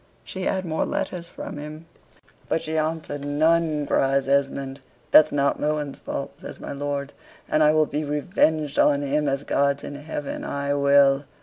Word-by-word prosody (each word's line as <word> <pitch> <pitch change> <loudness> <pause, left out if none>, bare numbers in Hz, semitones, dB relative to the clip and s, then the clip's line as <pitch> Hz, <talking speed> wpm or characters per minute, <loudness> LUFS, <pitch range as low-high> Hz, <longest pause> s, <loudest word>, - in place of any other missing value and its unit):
She 190 -1 -6
had 190 -1 -1
more 160 -2 -1
letters 170 -2 -3
from - - -7
him." 150 +2 -8 0.6
"But 165 - 0
she 155 - -3
answered 155 -2 -2
none," 155 +1 +2
cries 135 0 +1
Esmond. 140 0 0 0.3
"That's 155 - +7
not 140 -1 +1
Mohun's 150 -2 -2
fault," - - -5
says - - -9
my - - -7
lord, 140 0 -3 0.3
"and 155 - +1
I 150 0 +6
will 155 0 +3
be 150 +1 -3
revenged 150 0 0
on 145 -1 +4
him, 145 +1 0
as 135 +1 -2
God's 140 0 +1
in - - -6
heaven, 145 0 -5
I 140 0 -2
will." 140 0 +4
145 Hz, 170 wpm, -24 LUFS, 140-155 Hz, 0.6 s, That's